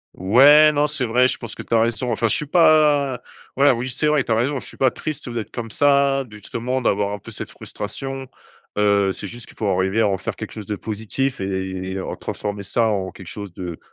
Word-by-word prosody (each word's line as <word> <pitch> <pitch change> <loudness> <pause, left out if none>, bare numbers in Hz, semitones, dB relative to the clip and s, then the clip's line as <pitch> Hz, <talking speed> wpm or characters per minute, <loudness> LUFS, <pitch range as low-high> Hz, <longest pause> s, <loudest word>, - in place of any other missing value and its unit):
Ouais 140 +11 +7
non, 150 0 +2
c’est 145 -3 -2
vrai 125 +2 +3
je - - -2
pense 115 -3 -7
que - - -7
tu - - -5
as 115 - +5
raison. 115 +2 0
Enfin 115 0 +1
je 110 - +1
suis 150 - -2
pas 150 -5 +4 0.4
ouais, 140 +1 +6
oui, 125 +1 -2
c’est 150 +3 0
vrai 150 -2 +3
tu - - -4
as - - +4
raison, 130 +5 0
je - - -12
suis - - -12
pas 130 - +4
triste, 150 +2 -6
heu, 120 - -5
d’être 110 -3 -4
comme 115 -2 -5
ça, 140 +1 +3
justement 120 +5 -4
d’avoir 100 -3 +1
un 105 - -5
peu - - -12
cette - - -7
frustration. 135 +5 -6 0.5
Heu, 100 -1 +3
c’est 100 - -6
juste 120 +4 -9
qu’il - - -17
faut 110 - -1
arriver 95 +3 +1
à - - +4
en 95 -1 0
faire - - -5
quelque - - -7
chose 105 -2 -7
de 105 - -3
positif 110 +6 -3
et 95 -1 -3
et 95 - -3
en - - -4
transformer 100 -1 -5
ça 115 +4 +1
en 95 -4 -1
quelque 95 +1 -12
chose 100 0 -8
de 90 -2 -6
115 Hz, 245 wpm, -21 LUFS, 100-135 Hz, 0.5 s, Ouais